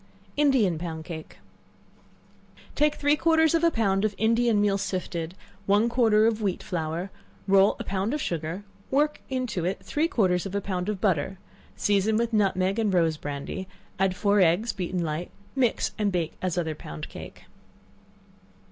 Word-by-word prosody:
Indian 255 - +3
Pound 160 -2 -5
Cake. 160 -2 -8 1.4
Take 300 0 +2
three 290 +1 +3
quarters 320 0 +3
of 330 0 +2
a 335 - +6
pound 200 -8 +1
of 215 -2 0
Indian 230 0 +3
meal 200 -1 +2
sifted, 175 -3 -3
and - - -26 0.3
one 205 +4 +4
quarter 225 -3 +4
of 225 -1 +1
wheat 195 -4 -1
flour; 170 +2 -3 0.4
roll 195 +1 +5
a - - -3
pound 195 +3 -1
of 300 - -1
sugar, 170 - -3 0.3
work 295 +2 +1
into 255 -9 -2
it 185 +3 -2
three 310 +3 +1
quarters 185 - +1
of 195 - -6
a - - +2
pound 185 -1 -3
of 210 -3 -2
butter; 190 -1 0 0.4
season 205 +1 +2
with 230 0 0
nutmeg 195 -1 +2
and 210 -4 +1
rose 165 -2 +3
brandy; 145 +6 -5 0.3
add 190 -1 +2
four 205 +1 +2
eggs 180 +7 +3
beaten 180 -2 -2
light; 160 +2 -3 0.3
mix 255 -4 +1
and 205 -2 +1
bake 170 -3 -1
as 180 -2 -1
other 160 -3 -1
pound 75 - -8
cake. - - -10
195 Hz, 165 wpm, -26 LUFS, 175-225 Hz, 1.4 s, a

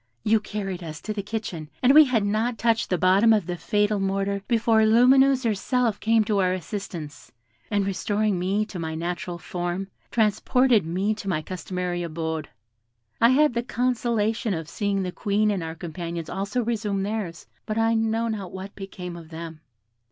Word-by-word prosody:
You 220 +1 +4
carried 195 -4 -5
us 155 -2 -7
to 215 - -4
the 205 - -3
kitchen, 200 -7 -5
and 255 +2 +6
we 310 +1 +9
had 230 -6 +1
not 220 +3 0
touched 230 +1 +1
the 180 - +1
bottom 190 +6 +5
of 210 -5 +1
the 175 0 -3
fatal 205 +3 +1
mortar 195 +1 -1
before 230 -1 +3
Lumineuse 260 +4 +5
herself 230 +1 0
came 225 0 +3
to 210 -1 0
our 185 -1 +2
assistance, 175 -5 -6 0.4
and 205 -1 +1
restoring 200 +1 0
me 195 +4 0
my 160 -1 -3
natural 175 +1 -4
form, 175 +2 -4 0.2
transported 225 -1 +3
me 190 +6 0
to 210 -2 -6
my 155 -4 -1
customary 180 0 -3
abode. 160 -2 -3 0.7
I 230 - +7
had 295 +2 +4
the 235 - 0
consolation 230 -3 0
of 160 -1 -5
seeing 200 0 -1
the 180 - -3
Queen 210 +3 +1
and 195 -3 -1
our 160 0 -5
companions 170 0 -5
also 200 +5 -1
resume 210 -4 -1
theirs, 200 -6 -4 0.2
but 215 - -2
I 225 0 +3
know 225 +1 +1
not 205 -5 -4
what 190 +2 -7
became 180 -3 -7
of 165 -2 -11
them. 160 -1 -8
200 Hz, 175 wpm, -25 LUFS, 180-225 Hz, 0.7 s, we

